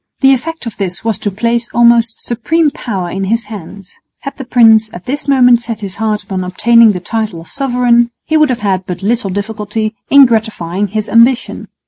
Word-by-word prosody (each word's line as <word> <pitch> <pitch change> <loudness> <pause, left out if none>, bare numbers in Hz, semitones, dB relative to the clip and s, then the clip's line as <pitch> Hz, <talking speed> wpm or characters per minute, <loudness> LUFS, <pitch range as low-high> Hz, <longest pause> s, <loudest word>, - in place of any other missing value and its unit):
The 270 0 +5
effect 325 +4 -4
of 230 - -7
this 190 +1 -4
was 225 -3 0
to 205 - -2
place 230 +4 -1
almost 235 -1 +2
supreme 295 +7 0
power 195 - -5
in 195 +1 -3
his 230 +4 -1
hands. 195 0 -11 0.3
Had 275 - -7
the 270 - -6
prince 225 -3 +4
at 175 - -10
this 285 +3 -4
moment 250 -3 +4
set 225 -2 -5
his 195 -2 -5
heart 215 -1 -2
upon 190 -2 -4
obtaining 225 +4 +4
the 180 - -4
title 215 -1 -4
of 165 - -14
sovereign, 245 -3 +1 0.2
he 315 - -1
would 305 -2 +4
have 245 -4 -2
had 190 -2 -1
but 180 0 -6
little 225 0 0
difficulty 210 +2 -3 0.2
in 280 -1 +7
gratifying 210 -5 -1
his 210 +2 -3
ambition. 235 +2 +2
225 Hz, 195 wpm, -13 LUFS, 200-240 Hz, 0.3 s, in